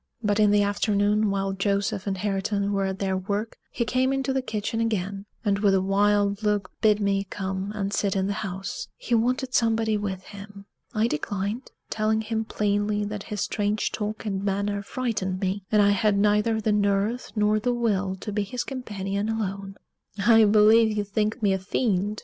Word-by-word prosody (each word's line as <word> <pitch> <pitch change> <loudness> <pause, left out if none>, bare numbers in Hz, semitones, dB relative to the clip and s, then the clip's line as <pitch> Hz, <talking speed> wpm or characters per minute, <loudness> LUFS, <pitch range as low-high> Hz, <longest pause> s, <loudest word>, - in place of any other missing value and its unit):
But 205 0 +1
in 210 -1 +5
the 205 0 +4
afternoon, 205 +1 +1
while 195 0 -1
Joseph 200 +1 -1
and 195 -1 -1
Hareton 200 +1 -1
were 195 -1 +1
at 190 0 -2
their 190 -1 -1
work, 200 +4 -3
he 235 - -2
came 255 +3 +1
into 270 0 0
the 265 - +1
kitchen 225 -1 -3
again, 200 -2 -2 0.2
and 200 -1 +2
with 200 -2 +3
a - - +4
wild 200 +1 +2
look 210 -3 0
bid 210 -1 +4
me 200 -1 +1
come 190 0 -3
and 200 -1 -2
sit 200 -1 0
in 190 -1 +1
the 200 - -1
house 195 - -5
he - - -4
wanted 250 +3 +1
somebody 225 -2 +2
with 190 -2 -4
him. 200 0 -11 0.3
I 215 +1 +2
declined, 205 - -3 0.2
telling 220 0 +1
him 220 0 -2
plainly 205 0 0
that 210 0 -5
his 210 -2 -3
strange 205 0 -1
talk 215 +1 -4
and 195 -2 -2
manner 200 +1 -1
frightened 200 -5 -2
me, 190 0 -2
and 210 -1 +5
I 205 - +5
had 205 0 +2
neither 210 +2 +2
the 215 0 0
nerve 205 +3 0
nor 210 0 +2
the 245 +3 0
will 205 -6 0
to 210 - -4
be 210 +1 0
his 220 +5 -3
companion 205 -5 -3
alone. 195 -3 -3 0.4
"I 220 +2 +6
believe 215 +1 +5
you 205 - +1
think 210 +2 -2
me 200 -2 +4
a 190 - -1
fiend!" 205 0 -1
205 Hz, 190 wpm, -25 LUFS, 200-220 Hz, 0.4 s, I